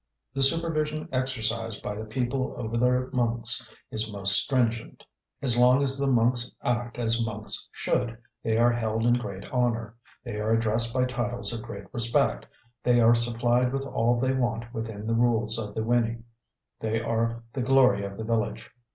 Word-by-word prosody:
The 135 - -3
supervision 155 0 0
exercised 115 -4 -2
by 105 - -4
the 110 +1 -7
people 130 +3 -3
over 115 0 -5
their 125 +2 +1
monks 115 -1 +2 0.2
is 110 0 -2
most 100 -1 +10
stringent. 115 +2 +1 0.4
As 120 -3 +3
long 125 +3 +4
as 135 -1 0
the 140 0 -2
monks 120 -1 +2
act 120 0 -2
as 115 -1 +1
monks 110 -1 -3
should, 120 -2 -2 0.2
they 110 0 -1
are 120 +1 +4
held 115 -1 -2
in 120 - +4
great 100 -5 -4
honour, 115 -3 -1 0.3
they 120 -4 -6
are 110 +1 0
addressed 115 +1 +1
by 125 +1 0
titles 120 -1 -3
of 115 - -5
great 100 -4 -9
respect, 115 - +1 0.3
they 120 -1 +2
are 115 0 +5
supplied 120 +1 0
with 135 0 -3
all 120 -2 0
they 130 +1 0
want 120 -2 -3
within 110 -2 -6
the 115 - -1
rules 115 -1 +1
of 105 -2 -6
the - - -2
Wini, 115 0 -1 0.6
they 110 0 -2
are 115 +1 -2
the 135 - -3
glory 125 -5 +3
of 100 0 -7
the 110 - -5
village. 110 -1 -3
115 Hz, 175 wpm, -26 LUFS, 110-125 Hz, 0.6 s, most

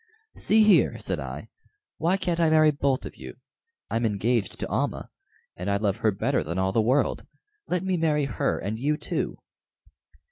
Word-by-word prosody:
"See 220 +1 +4
here," 210 -1 +4
said - - -3
I, - - -7 0.5
"why 175 +4 +2
can't 175 -3 -2
I 165 -1 +4
marry 155 -1 +5
both 140 -2 -1
of - - -9
you? - - -9 0.6
I'm 115 - 0
engaged 110 0 0
to - - -3
Almah, - - -2 0.4
and 90 +3 -4
I 100 - +2
love 100 0 0
her 110 -1 +2
better 95 - 0
than 85 +3 -4
all 95 0 +1
the 110 - +2
world. 130 +6 +1 0.4
Let 180 0 -1
me 190 -1 0
marry 150 -3 +1
her 125 -6 -1
and 105 +4 -4
you 150 +4 0
too." - - -3
135 Hz, 180 wpm, -26 LUFS, 105-160 Hz, 0.6 s, marry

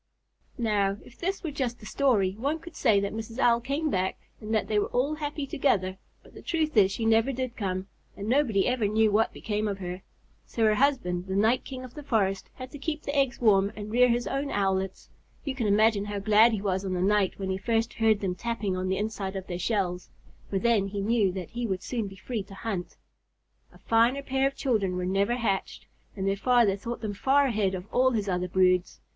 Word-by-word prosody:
Now, 205 -4 +1
if 240 - -17
this 385 +3 -2
were 320 - -3
just 255 -4 -3
a - - -9
story, 215 -8 +2
one 285 +6 0
could 330 0 -12
say 220 -6 +3
that 200 0 -2
Mrs. 225 +1 -6
Owl 235 -3 +3
came 280 +5 -1
back 185 0 0 0.2
and 215 0 -7
that 220 -1 +1
they 210 -1 +2
were - - 0
all 270 +5 0
happy 295 -1 -4
together; 190 -9 0 0.2
but - - -18
the - - -11
truth 315 -3 -1
is 195 -3 +5
she 225 +3 -3
never 225 +4 +3
did 255 -1 -4
come, 185 -3 -3 0.3
and 200 - -5
nobody 235 -6 +2
ever 250 -4 +1
knew 215 +1 +3
what 220 +2 +2
became 210 0 -2
of 200 -2 -2
her. 180 -1 -6 0.5
So 230 - -2
her 215 -1 +5
husband, 210 -8 +1
the 190 - -2
night 220 +5 +3
king 255 -1 -7
of 255 - -10
the 300 - -8
forest, 205 -8 0
had 255 0 -8
to 290 - -9
keep 300 +1 -3
the 280 - -3
eggs 275 -3 +1
warm 200 -3 +4
and 210 0 -7
rear 250 +2 +5
his 240 +1 +1
own 275 +1 -2
Owlets. 190 -3 -1 0.3
You 275 - -2
can 245 -5 -2
imagine 205 0 +3
how 205 0 -4
glad 215 +3 +5
he 205 -2 -2
was 190 -1 0
on 190 -1 -2
the 180 - -1
night 200 -1 +2
when 190 -1 -3
he 190 - -1
first 225 +2 0
heard 220 -2 +2
them 190 -3 -1
tapping 210 -1 -2
on 185 0 -2
the 190 0 0
inside 205 -2 -3
of 190 -1 -4
their 175 -1 -5
shells, 180 -3 -1 0.4
for 195 - -1
then 215 -1 +2
he 200 0 -4
knew 210 -2 +2
that 185 -3 -6
he 240 0 -3
would 190 -3 -3
soon 230 -5 -2
be 195 - -10
free 215 +4 -4
to 195 0 -12
hunt. 195 -5 -5 0.7
A - - -17
finer 235 +5 +2
pair 270 0 +1
of 275 - -5
children 215 -10 0
were 180 0 -2
never 200 +5 +1
hatched, 220 -6 -2 0.3
and 195 -1 -2
their 195 - +2
father 235 -3 +3
thought 235 +4 -6
them 215 -2 -3
far 275 +7 +3
ahead 210 -6 0
of 180 0 -6
all 255 +1 +4
his 215 -5 -1
other 180 -1 -1
broods. 180 0 +2
215 Hz, 230 wpm, -27 LUFS, 195-250 Hz, 0.7 s, is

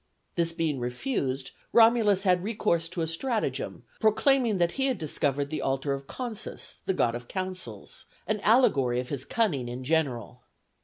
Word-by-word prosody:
This 170 -1 +1
being 165 -5 -1
refused 130 - -2 0.2
Romulus 225 -4 +5
had 180 -2 +3
recourse 195 -6 0
to 170 -2 -2
a - - +1
stratagem, 215 +8 -2 0.2
proclaiming 235 0 +3
that 170 -1 +2
he 270 +5 0
had 260 - 0
discovered 145 -3 -1
the 155 - -2
altar 135 +1 0
of 135 0 -6
Consus, 240 -5 -5
the 190 - +2
god 115 -8 +2
of 120 0 -6
counsels, 185 - -6 0.2
an 215 +2 -1
allegory 140 - +4
of 125 - -4
his 135 -2 -3
cunning 150 - 0
in 125 +2 -6
general. 125 -5 -1
165 Hz, 160 wpm, -28 LUFS, 135-215 Hz, 0.2 s, Romulus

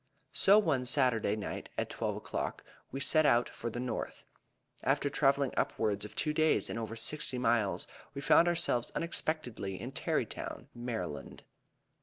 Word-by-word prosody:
So 200 +2 +6
one 145 -11 +2
Saturday 120 -7 +2
night, 105 - -5
at - - -2
twelve - - -2
o'clock, - - -4 0.3
we 135 - -4
set 155 +3 +4
out 120 -4 +4
for 120 - -5
the 120 - -5
North. 125 -2 -4 0.6
After 145 - +1
traveling 140 -1 +2
upwards 105 -2 0
of 105 - -10
two 150 - 0
days 155 0 +2
and - - -3
over 115 0 -4
sixty 130 +3 -2
miles, 115 -7 +1 0.3
we - - -3
found 165 +4 +5
ourselves 165 -8 +2
unexpectedly 140 - -2
in - - -5
Terrytown, - - -3
Md. 115 -10 -5
125 Hz, 150 wpm, -32 LUFS, 115-150 Hz, 0.6 s, So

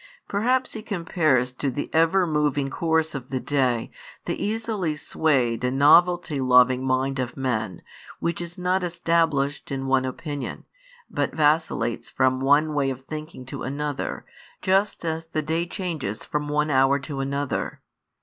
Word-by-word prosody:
Perhaps 250 +6 +1
He 220 - -5
compares 165 - +1
to 135 +2 -2
the 140 +3 -3
ever 165 +4 +4
moving 150 -3 0
course 160 0 +1
of 130 -3 -6
the 130 - -1
day, 125 -4 0 0.3
the - - -3
easily 210 -7 -1
swayed 130 -6 +1
and 125 +1 0
novelty 170 +1 +5
loving 125 0 +5
mind 130 +1 0
of 130 +1 -3
men, 110 -8 -2 0.4
which 170 0 -1
is 175 0 -7
not 180 +1 0
established 165 -5 0
in 135 -1 -3
one 135 -1 +2
opinion, 145 +2 -5 0.4
but - - -2
vacillates 150 -6 +1
from 130 0 +2
one 145 +3 +3
way 140 -2 +1
of 130 -1 -5
thinking 155 -3 -7
to 130 - -7
another, 145 +2 -3 0.4
just 195 -1 +1
as 160 0 -2
the 155 - 0
day 165 +3 -1
changes 160 - -4
from 150 0 -2
one 150 +1 +1
hour 135 +1 +4
to 140 0 -6
another. 140 +1 -2
145 Hz, 150 wpm, -24 LUFS, 130-165 Hz, 0.4 s, novelty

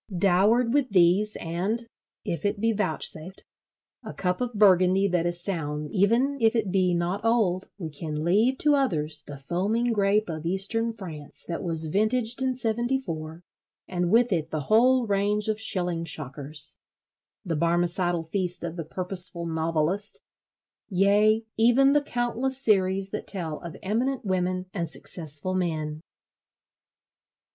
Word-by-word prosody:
Dowered 205 +7 +3
with 285 -2 +1
these 195 +3 +3
and 190 +8 -2 0.4
(if 170 -3 -4
it 205 0 -1
be 225 +1 +1
vouchsafed) 180 -2 -1 0.6
a 215 - -9
cup 180 +3 -2
of 245 -2 -3
Burgundy 190 -1 +4
that 175 -2 0
is 175 0 -4
sound 150 -5 -4
even 235 +8 +1
if 225 +1 +3
it 215 -5 -1
be 185 -2 +1
not 175 +4 -2
old, 215 -6 0
we 165 -5 -6
can 150 +1 -5
leave 215 +10 +2
to 295 +1 +3
others 155 - +2
the 145 - -8
foaming 205 - -1
grape 205 0 +1
of 155 -2 -6
Eastern 195 +6 +1
France 165 -9 -10
that 170 - -4
was 165 -2 +5
vintaged 220 +7 +2
in 260 -1 0
'74, 225 -9 -3 0.4
and 180 -1 -2
with 230 +3 +3
it 160 -3 -2
the 155 - -3
whole 245 - +3
range 205 +1 0
of 215 0 -1
shilling 175 -5 +1
shockers,—the 155 - -2
Barmecidal 175 +1 0
feast 180 0 -3
of 170 0 -5
the 165 - -4
purposeful 180 0 +2
novelist—yea, 195 +5 -1
even 245 +5 +4
the 295 - +3
countless 245 0 -2
series 195 -5 +1
that 210 - -6
tell 165 -6 +1
of 170 -2 -9
Eminent 240 +6 -2
Women 185 -1 -1
and 170 -4 -3
Successful 160 +2 -3
Men. 155 -4 -3
190 Hz, 140 wpm, -25 LUFS, 170-220 Hz, 0.6 s, was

